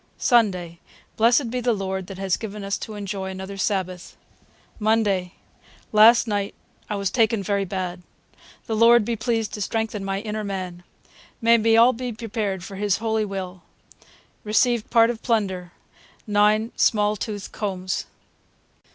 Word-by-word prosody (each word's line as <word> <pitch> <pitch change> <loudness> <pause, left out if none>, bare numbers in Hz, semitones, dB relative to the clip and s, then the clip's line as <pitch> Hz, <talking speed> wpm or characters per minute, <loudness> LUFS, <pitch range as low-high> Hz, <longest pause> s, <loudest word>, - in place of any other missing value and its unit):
Sunday. 185 -9 +2 0.4
Blessed 235 +2 +3
be 250 0 -2
the 240 0 +2
Lord 190 -2 -3
that 195 - -8
has 195 -1 0
given 210 -2 -7
us 195 0 -1
to 215 - -7
enjoy 200 -2 -4
another 190 +1 -7
Sabath. 185 -3 -3 0.6
Monday. 210 -4 +1 0.6
Last 225 +3 +6
Night 205 -2 -2 0.3
I 210 - -1
was 200 -1 -1
taken 225 -3 +2
verry 200 +1 0
Bad. 185 -1 -4 0.6
The 225 - -2
Lord 230 0 +6
be 235 - -1
pleased 225 -1 -1
to 210 - -5
strengthen 220 -1 -2
my 195 0 -2
Inner 215 0 -4
Man. 185 -3 -5 0.6
May 230 0 +5
we 225 +1 +4
all 240 +3 +6
be 250 +1 -4
Prepared 215 -5 -3
for 195 +1 -8
his 205 -1 +1
Holy 220 -1 0
Will. 190 -2 -6 0.8
Recd 220 +2 +1
part 230 0 +5
of 230 - -8
Plunder 190 -6 -1 0.5
9 210 +2 +2
Small 210 -1 +2
tooth 205 -1 -5
combs.' 190 -3 -3
210 Hz, 150 wpm, -23 LUFS, 190-225 Hz, 0.8 s, Last